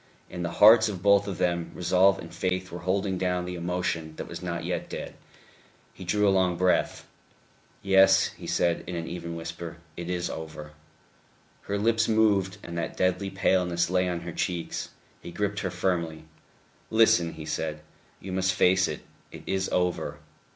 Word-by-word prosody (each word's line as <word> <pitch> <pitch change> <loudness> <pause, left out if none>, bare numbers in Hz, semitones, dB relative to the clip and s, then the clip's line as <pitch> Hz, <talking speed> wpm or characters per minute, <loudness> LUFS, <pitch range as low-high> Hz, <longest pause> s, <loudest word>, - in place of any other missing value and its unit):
In 90 - -5
the 85 - -3
hearts 110 +2 +8
of 95 -4 -6
both 100 0 +5
of 95 -3 -4
them 85 -2 0
resolve 95 +2 +3
and 85 - -10
faith 95 0 -2
were 85 - -6
holding 95 +1 -1
down 90 -1 0
the 90 - -5
emotion 85 -2 -3
that - - -6
was - - -7
not - - -4
yet - - -3
dead. - - -6 0.8
He 95 - -10
drew 105 +3 +2
a 100 - +4
long 90 -2 +2
breath. 90 0 +1 0.8
"Yes," 95 0 +5
he - - -11
said 85 -1 +1
in 90 - -4
an 85 -1 -4
even 85 -1 -5
voice, 80 0 -5 0.4
"it 85 0 -6
is 90 -1 -1
over." 80 -1 -7 0.9
Her 100 - -3
lips 115 +2 +2
moved; 105 -3 +2
and 85 - -7
that 80 - -4
deadly 95 +1 +1
paleness 90 -3 +1
lay 90 0 +2
on 85 -1 -3
her 85 0 -6
cheeks. 85 0 -3 0.3
He - - -8
gripped 100 +3 -2
her 95 - -2
firmly. 85 -3 -2 0.6
"Listen," 110 -7 +4
he 80 -1 -8
said. 75 0 -3 0.4
"You 95 - -8
must 95 0 +1
face 95 0 +4
it. - - -5 0.3
It - - -10
is 95 0 -1
over. 90 -1 -1
90 Hz, 175 wpm, -27 LUFS, 85-95 Hz, 0.9 s, hearts